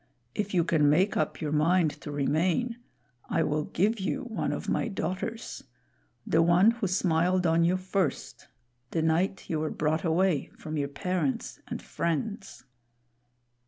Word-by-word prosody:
If 205 -2 -2
you 170 - +4
can 155 -3 +3
make 185 +7 +3
up - - -1
your 150 -2 -2
mind 160 +2 +3
to 150 - -6
remain, 165 - 0 0.5
I - - +2
will 150 0 0
give 210 +5 +1
you 270 +8 -2
one 235 -3 -2
of - - -4
my - - 0
daughters 210 +4 -4 0.6
the 160 - +3
one 175 +6 +5
who 230 -3 -2
smiled 180 0 +2
on 165 0 +3
you 175 +2 +3
first 185 -4 -2 0.4
the 160 +2 -1
night 175 +4 +1
you 160 - -1
were 155 0 -1
brought 155 +1 0
away 170 -2 +1
from 155 0 -6
your 145 -2 0
parents 160 -1 -2
and - - -5
friends." 195 +4 -3
175 Hz, 155 wpm, -28 LUFS, 155-195 Hz, 0.6 s, one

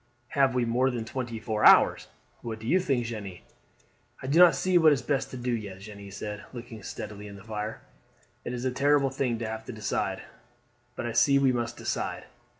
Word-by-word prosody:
Have 135 -2 +2
we 125 -1 +2
more 125 +3 +2
than 120 -3 -3
twenty 120 -1 -4
four 110 0 -2
hours? - - +6 0.3
What 115 -2 -5
do 110 - -11
you 180 +11 +3
think, 135 -9 0
Jeanne?" 105 -6 -6 0.9
"I - - -5
do 145 +6 +2
not 180 -2 +8
see 185 -1 +3
what 160 -2 +6
is 130 -4 -2
best 140 -1 -1
to 130 - -7
do 125 0 -2
yet," 100 -5 -4
Jeanne 100 -1 -10
said, 105 +1 -6
looking 120 -2 -9
steadily 105 +1 -7
in 100 - -10
the 100 - -12
fire. 110 0 -5 0.6
"It - - -4
is 125 +1 -4
a 130 - +1
terrible 140 +1 +2
thing 130 -3 -1
to 115 0 -4
have 110 0 -5
to - - -6
decide; 110 -4 -2 0.7
but 130 - -4
I 120 - -2
see 140 +5 +4
we 135 -1 +4
must 120 -1 -2
decide." - - -3
120 Hz, 210 wpm, -28 LUFS, 110-130 Hz, 0.9 s, not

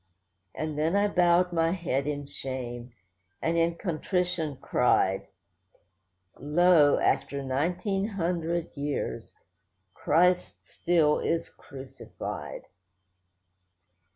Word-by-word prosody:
And 155 -1 -3
then 160 +5 +1
I 205 +1 +3
bowed 180 -1 +3
my 165 0 +2
head 145 -7 -2
in 145 -1 -3
shame, 125 -3 -6 0.5
and 165 +1 0
in 170 0 +2
contrition 175 -3 -2
cried— 95 -6 +1 1.1
'Lo, 150 0 +4
after 140 0 0
nineteen 180 +9 -1
hundred 170 -4 -2
years, 145 0 -4 0.6
Christ 180 +2 +1
still 165 -4 +2
is 165 0 -1
Crucified. 135 -1 -8
165 Hz, 90 wpm, -28 LUFS, 140-175 Hz, 1.1 s, Lo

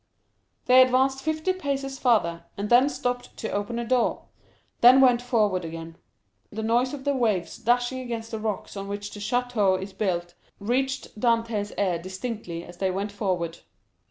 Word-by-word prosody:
They 255 +1 +7
advanced 260 +1 +3
fifty 315 +4 0
paces 275 -6 -3
farther, 170 -9 +2
and 205 +2 -4
then 255 +4 +6
stopped 245 -3 -4
to 220 - -4
open 205 +4 -2
a 235 - -2
door, 245 0 +1 0.6
then 250 +2 +8
went 250 -2 +5
forward 215 -7 +1
again. 165 0 -7 0.6
The 220 +1 -4
noise 245 +5 +1
of 270 - -10
the 285 0 +1
waves 215 -9 0
dashing 245 +2 +1
against 230 -3 -5
the 220 - -3
rocks 215 -1 -4
on 195 0 -5
which 205 0 -5
the 205 - -8
château 215 -4 +1
is 190 +1 -7
built, 175 -3 -2 0.3
reached 260 +2 -2
Dantès' 230 -3 0
ear 185 -4 +1
distinctly 185 -1 -5
as 175 0 -12
they 190 +1 0
went 200 +3 -3
forward. 180 -5 -2
225 Hz, 165 wpm, -26 LUFS, 195-250 Hz, 0.6 s, then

